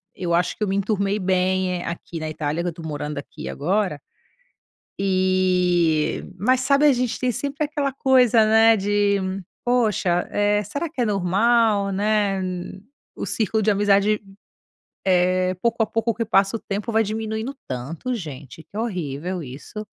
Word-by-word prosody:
eu 175 -2 -2
acho 175 +1 +1
que - - -3
eu - - 0
me 195 - 0
enturmei 200 0 0
bem 185 -1 0
aqui 170 0 -6
na 155 0 -4
Itália 155 +1 -2
que - - -2
eu - - +1
estou 165 -1 -9
morando 150 -1 -4
aqui 140 - -7
agora. 185 0 -1 1.0
E 185 -4 +2 0.2
mas 255 +6 +2
sabe 280 +3 +3
a 285 - +6
gente 250 -1 -1
tem 255 -1 +1
sempre 280 +5 -2
aquela 290 -2 -2
coisa, 255 -4 +4
né, 225 +1 +5
de 205 0 +2 0.5
poxa, 215 -8 +1
eh, 205 0 +2
será 285 - -4
que 295 -5 -4
é - - +2
normal, 205 +1 +2
né, 205 -1 +1 0.7
o - - -4
círculo 220 0 0
de 215 - +2
amizade, 205 +1 +3 0.9
eh, 185 0 +2
pouco 235 -1 +1
a - - 0
pouco 225 +1 0
que 230 - -2
passa 200 -2 +2
o - - -14
tempo 205 +3 -4
vai 225 0 +4
diminuindo 220 +3 -3
tanto 140 - -4
gente 150 - -8
que 205 - -12
horrível 180 - -3
isso. 145 +11 -8
200 Hz, 160 wpm, -23 LUFS, 180-225 Hz, 1.0 s, a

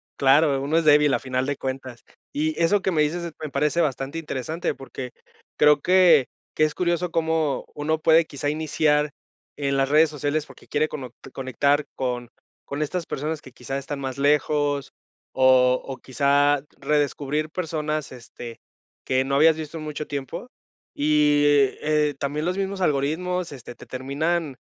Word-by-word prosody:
Claro, 140 0 +4
uno 150 +4 +1
es 165 - +1
débil 150 -1 +5
a - - +2
final 130 0 -2
de 140 0 -2
cuentas. 130 -3 -6 0.3
Y 155 +2 -1
eso 200 +5 +3
que 190 - 0
me 155 -3 +2
dices, 165 +4 -1
se 170 - -5
me 150 - -5
parece 150 +4 +1
bastante 140 -1 -2
interesante 160 +1 -3
porque 130 -1 -8 0.5
creo 150 0 +5
que 175 -6 +5 0.3
que 155 - +2
es 155 -1 +2
curioso 175 -1 -1
cómo 160 -4 0
uno 155 +2 -1
puede 160 +1 +5
quizá 145 -1 -3
iniciar 150 -1 +1 0.5
en 140 -1 0
las 135 0 +1
redes 155 +2 +5
sociales 150 +1 -2
porque - - -16
quiere 155 +1 +1
conot 130 -6 -7 0.2
conectar 140 +3 +1
con 125 -2 -3 0.4
con 140 +2 -5
estas 170 +3 -2
personas 155 +2 -4
que 130 - -12
quizá 125 +2 -5
están 140 +1 -5
más 130 -1 -4
lejos 145 0 +1 0.4
o 130 -1 +5
o 135 -1 -6
quizá 140 +1 +2 0.2
redescubrir 150 +1 -1
personas, 155 -3 -3
este, 120 -1 -10 0.5
que 130 0 +2
no 135 +1 -1
habías 155 +3 +6
visto 160 0 -6
en 155 - -6
mucho 150 0 -5
tiempo 140 - -5 0.5
y, 150 0 +3 0.4
eh, 150 -1 +1
también 145 +2 -2
los 180 +1 -1
mismos 195 0 -3
algoritmos, 170 +4 0
este, 125 -3 -10
te - - -13
terminan 140 +3 -2
150 Hz, 165 wpm, -24 LUFS, 135-155 Hz, 0.5 s, habías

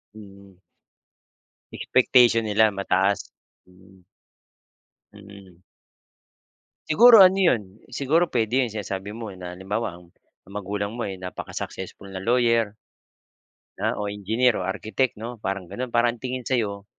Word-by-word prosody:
Mm. 100 -2 -14 1.2
Expectation 120 -2 +3
nila 110 0 +3
mataas. 100 0 0 0.4
Mm. 95 0 -21 1.1
Mm. 100 -3 -15 1.3
Siguro 225 +4 +8
ano 185 +1 +5
yun 170 - +3 0.3
siguro 145 +7 +1
pwede 120 0 0
yun 125 - +2
sinasabi 100 -1 -6
mo 115 -3 -7
na 90 -1 -7
halimbawa, 95 +1 -4
um, 85 -1 -17 0.3
ang 100 - -16
magulang 100 +1 -4
mo 115 -1 -4
ay 95 - -5
napaka-successful 95 +1 -7
na 95 - -6
lawyer 115 -1 +1 1.0
na - - -2
o 105 - -3
engineer 110 +5 +1
o 95 - -3
architect 105 +6 -2
'no, 115 0 -8
parang 95 -2 -3
gano'n, 120 +8 -6
parang 120 0 +2
ang 120 - -16
tingin 130 -1 -5
sa - - -2
'yo 100 -5 -2
105 Hz, 130 wpm, -24 LUFS, 95-120 Hz, 1.3 s, Siguro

